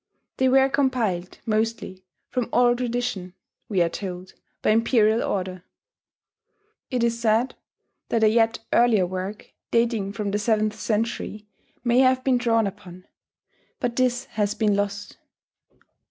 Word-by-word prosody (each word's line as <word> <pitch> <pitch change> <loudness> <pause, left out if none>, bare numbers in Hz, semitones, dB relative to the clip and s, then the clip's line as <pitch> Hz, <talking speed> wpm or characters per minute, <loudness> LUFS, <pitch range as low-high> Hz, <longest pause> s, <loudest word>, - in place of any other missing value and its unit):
They 260 0 +3
were 265 +1 +5
compiled, 235 -10 -1
mostly, 215 -4 -2 0.2
from 250 -3 -1
oral 245 -1 +4
tradition 240 -7 -3 0.3
we 190 -5 +3
are 170 - 0
told, 185 0 -7 0.3
by - - +3
imperial 225 0 +3
order. 185 -2 -3 1.3
It 250 -3 0
is 235 0 0
said 230 +2 +2 0.6
that 230 -1 +1
a - - +7
yet 225 +1 +3 0.2
earlier 230 -6 +4
work, 185 +3 -6 0.2
dating 230 -4 +1
from 205 0 -3
the 205 - 0
seventh 215 -1 +1
century, 215 -1 -2 0.4
may 240 0 +3
have 255 0 +4
been 255 -2 +2
drawn 230 -2 +2
upon; 185 -2 -8 0.7
but 240 -1 -2
this 250 0 +1
has 210 -5 -2
been 210 -3 +2
lost. 200 0 -3
220 Hz, 135 wpm, -24 LUFS, 200-240 Hz, 1.3 s, a